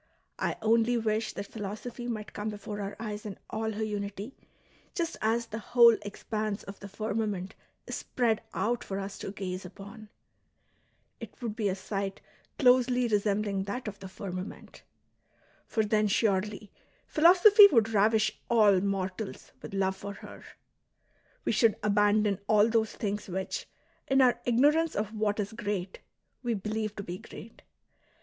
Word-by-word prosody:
I - - -1
only 230 +2 +3
wish 220 -1 -1
that 200 - -5
philosophy 220 +4 -6
might 215 -3 -5
come 210 +1 -3
before 210 0 -6
our 200 0 -5
eyes 210 -2 -5
in 205 -2 -7
all 220 0 -2
her 215 +1 -3
unity, 205 +2 -4 0.6
just 335 -3 -1
as 230 +2 +1
the 220 -1 -6
whole 235 0 +6
expanse 210 0 -4
of 195 0 -10
the 200 - -8
firmament 210 -2 -3 0.3
is - - -4
spread 230 -3 0
out 240 +2 -1
for 195 - -4
us 195 0 -6
to - - -5
gaze 185 -2 -5
upon! 200 +4 -11 1.1
It - - -10
would 230 -4 -4
be 210 -3 0
a 185 - -1
sight 195 0 -4 0.4
closely 250 -1 +4
resembling 205 -2 0
that 230 +5 -4
of 200 -1 -6
the 195 - -8
firmament. 185 0 -7 0.9
For 220 -2 0
then 210 0 +2
surely 205 0 0 0.3
philosophy 375 +6 +8
would 225 -4 +4
ravish 215 0 +3 0.2
all 210 -5 +5
mortals 195 +1 -3
with - - -7
love 190 -1 +1
for 200 +1 -7
her"; - - -12 1.0
we - - +2
should 225 -3 +4
abandon 205 -1 +3
all 210 0 +5
those 220 -1 +1
things 205 -1 -3
which, 190 +1 -4 0.4
in 270 0 +3
our 245 -1 +3
ignorance 295 +7 +3
of 210 +1 -2
what 215 -1 0
is 205 +1 -2
great, 205 -4 -4 0.4
we 240 -2 -1
believe 215 +1 -3
to 200 - -5
be 180 0 -6
great. 225 - -12
210 Hz, 155 wpm, -29 LUFS, 200-230 Hz, 1.1 s, philosophy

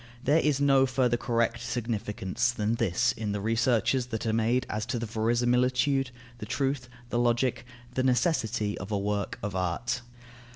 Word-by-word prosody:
There 150 +4 +4
is 150 -3 +1
no 135 -1 +4
further 125 -2 +2
correct 115 -1 0
significance 115 -1 -1
than 110 -2 -1
this 115 0 +1
in 105 -2 -3
the 105 - -2
researches 115 +3 +1
that 110 -2 -4
are 110 - +1
made 115 +3 +2
as 105 0 -3
to 125 - -1
the 115 - -3
verisimilitude, 125 +4 +1 0.3
the 105 - -6
truth, 135 -3 -1 0.2
the 120 - +1
logic, 120 0 +1 0.3
the 130 - 0
necessity, 120 - +1
of 95 +3 -7
a 105 - +1
work 100 0 -2
of 100 -2 -3
art. 95 +8 -1
120 Hz, 165 wpm, -28 LUFS, 110-125 Hz, 0.3 s, There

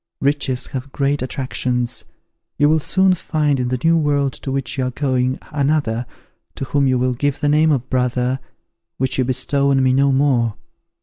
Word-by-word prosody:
Riches 140 -2 0
have 135 +1 -5
great 140 +1 0
attractions. 125 -2 -2 0.5
You 145 +1 +4
will 160 +1 +3
soon 190 +4 +3
find 150 -5 0
in 125 - 0
the 130 +1 -1
new 165 +1 +4
world 145 -4 +1
to 135 - -6
which 135 -2 -2
you 130 -2 -1
are - - -1
going, 130 -1 0
another, 140 -5 0 0.5
to 135 - -4
whom 140 0 +1
you 130 -1 +2
will 125 0 +1
give 145 +3 -1
the 145 - 0
name 155 +2 +4
of 130 -3 0
brother, 125 0 0 0.6
which 130 0 -1
you - - +4
bestow 135 +2 0
on 135 -1 +3
me 130 -1 +3
no 140 +1 +3
more. 130 -5 +2
135 Hz, 185 wpm, -19 LUFS, 125-145 Hz, 0.6 s, You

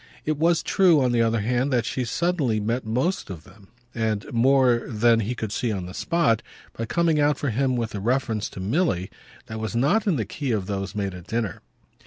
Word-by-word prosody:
It 155 -1 0
was 170 +1 +3
true, 180 -5 +4
on 130 -2 +2
the 120 -1 +2
other 115 -1 +1
hand, 125 +5 0
that 120 -3 +1
she 125 +2 -2
suddenly 145 -5 0
met 115 +3 -2
most 130 - -1
of 85 -4 -8
them 100 -3 -18 0.3
and 110 -3 -1
more 125 0 +4
than 115 +1 +3
he 115 +3 -2
could 110 -3 -4
see 120 +2 -1
on 95 -4 -3
the 90 - -8
spot 160 - +1 0.3
by 115 - -3
coming 165 +2 +2
out 145 -1 +3
for 140 - -2
him 130 +3 +1
with 115 -2 -3
a 100 - -3
reference 115 -1 -1
to - - -10
Milly 95 - 0 0.3
that 110 0 -6
was 110 +1 -4
not 150 - +2
in 185 - +3
the 110 -6 -1
key 135 +6 -4
of 100 -4 -1
those 100 -1 -4
made 100 -2 -2
at 90 -1 -11
dinner. 115 -3 -2
115 Hz, 220 wpm, -24 LUFS, 105-140 Hz, 0.3 s, true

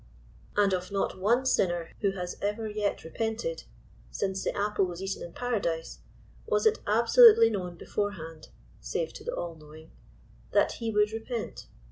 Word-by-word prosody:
And 200 -2 +4
of 185 +1 -2
not 195 -1 -1
one 235 +7 +2
sinner 175 -9 +1
who 200 -2 +1
has 180 -2 -5
ever 210 +2 -1
yet 210 -1 -2
repented, 225 - -3 0.4
since 190 -1 -2
the - - -2
apple 205 -1 +1
was 175 -1 -6
eaten 195 0 -4
in 170 - -7
Paradise* 195 -9 -2 0.5
was 445 -1 +1
it 440 0 +4
absolutely 440 - +7
known 180 -4 -4
beforehand 165 -6 -4 0.2
— - - -27
save 485 - -1
to 425 - -10
the 485 +3 -3
All*knowing— 160 -1 -8 0.3
* - - -27
that - - +4
he 230 - -1
would 210 -1 +2
repent. 225 +1 -5
205 Hz, 160 wpm, -28 LUFS, 180-225 Hz, 0.5 s, absolutely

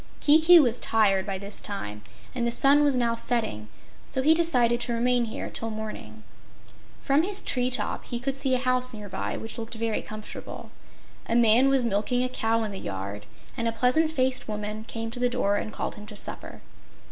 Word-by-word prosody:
Kiki 320 +4 +7
was 245 -6 +2
tired 200 -3 +2
by 195 -1 -2
this 200 +1 -1
time, 105 - -5 0.3
and 240 -2 -1
the - - 0
sun 280 +4 +4
was 285 -2 +3
now 235 -2 +1
setting, 225 - -1 0.4
so 260 - -2
he 310 +3 +6
decided 250 -8 +2
to 240 - -2
remain 245 +1 +2
here 220 - -5
till 225 - -4
morning. 215 - -7 0.8
From 275 +2 +2
his 400 +4 -1
tree 250 -8 0
top 255 - -2
he 240 - -3
could 265 +2 -2
see 270 -1 +1
a - - +2
house 255 -1 0
near 210 -1 -8
by, - - -4
which 225 +2 -6
looked 230 +1 -6
very 225 -1 -1
comfortable. 215 0 -8 0.6
A 230 - 0
man 235 +3 +5
was 270 -3 +2
milking 235 +3 +1
a 255 - 0
cow 225 -2 0
in 215 - -3
the 195 - -6
yard 100 +1 -6 0.3
and 230 - -1
a - - +1
pleasant 250 +7 +2
faced 260 -4 +1
woman 210 0 -5
came 225 0 -5
to 245 - -7
the 245 0 +2
door 205 -4 0
and 215 - -4
called - - -4
him 210 0 -11
to 210 - -10
supper. - - -7
235 Hz, 205 wpm, -26 LUFS, 215-255 Hz, 0.8 s, Kiki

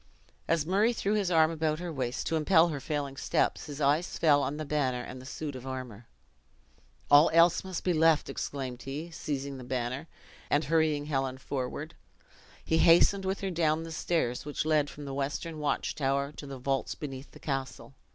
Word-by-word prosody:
As 165 -2 +1
Murray 205 +7 +3
threw 210 -2 -1
his 205 -4 +1
arm 160 -2 +4
about 155 -1 0
her 175 0 -5
waist, 125 -3 -3
to 165 - 0
impel 160 +2 +4
her 150 -3 -3
failing 140 -1 -3
steps, - - 0
his 145 -1 -7
eyes 150 +4 +1
fell 145 -3 +4
on 140 +2 -2
the 155 - -4
banner 130 -4 0
and 125 +1 -8
the 130 - -11
suit 145 0 -5
of 130 +1 -8
armor. 125 -4 -7 1.0
"All 145 +2 +8
else 170 +1 +5
must 185 -2 -5
be 180 - +2
left," 160 -1 +4
exclaimed 130 -3 -4
he, 150 +7 -6
seizing 140 -3 -4
the - - -8
banner; 130 +4 -3 0.4
and 145 +2 +2
hurrying 155 -3 +1
Helen 135 -3 -1
forward, 130 -1 -4 0.7
he 160 - +2
hastened 180 +4 +5
with 190 +1 -2
her 195 -1 -2
down 160 -2 +1
the 165 - -7
stairs 155 -6 -1
which 150 +1 -3
led 155 -2 +2
from 145 - -9
the 135 - -5
western 145 +4 -3
watch 150 -1 -1
tower 140 0 0
to 150 -1 -9
the 135 -1 -7
vaults 135 +1 -1
beneath 135 -2 -7
the - - -15
castle. 135 -1 -4
145 Hz, 190 wpm, -29 LUFS, 135-165 Hz, 1.0 s, All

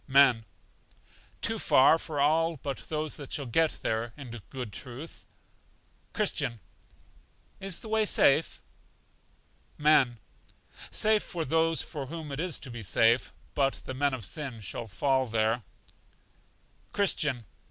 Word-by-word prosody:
Men. 130 -5 +5 1.0
Too - - +1
far 135 +5 +5
for 150 -3 -5
all 160 +3 +2
but 135 0 -4
those 155 -1 -2
that 145 -3 -9
shall 140 - -1
get 160 +6 +1
there, 110 +1 -1
in 135 -5 -9 0.2
good 125 -6 -6
truth. 130 - -7 0.8
Christian. 135 - -1 1.0
Is 195 -3 -3
the - - -7
way 220 0 +2
safe? 155 -5 +3 1.1
Men. 145 -5 +4 0.7
Safe 215 -1 +3
for 170 -3 -4
those 165 +3 +2
for 145 -5 -6
whom 160 0 -7
it 140 - -4
is 180 -1 -1
to 130 - -7
be 120 -1 -7
safe; 115 +4 +3 0.2
but 135 -1 +2
the 130 - -4
men 140 +1 +1
of 115 -6 -6
sin 130 +2 -5
shall 115 +4 -5
fall 130 +6 +1
there. 110 +1 +1 1.3
Christian. 150 - +1
140 Hz, 130 wpm, -29 LUFS, 120-160 Hz, 1.3 s, Men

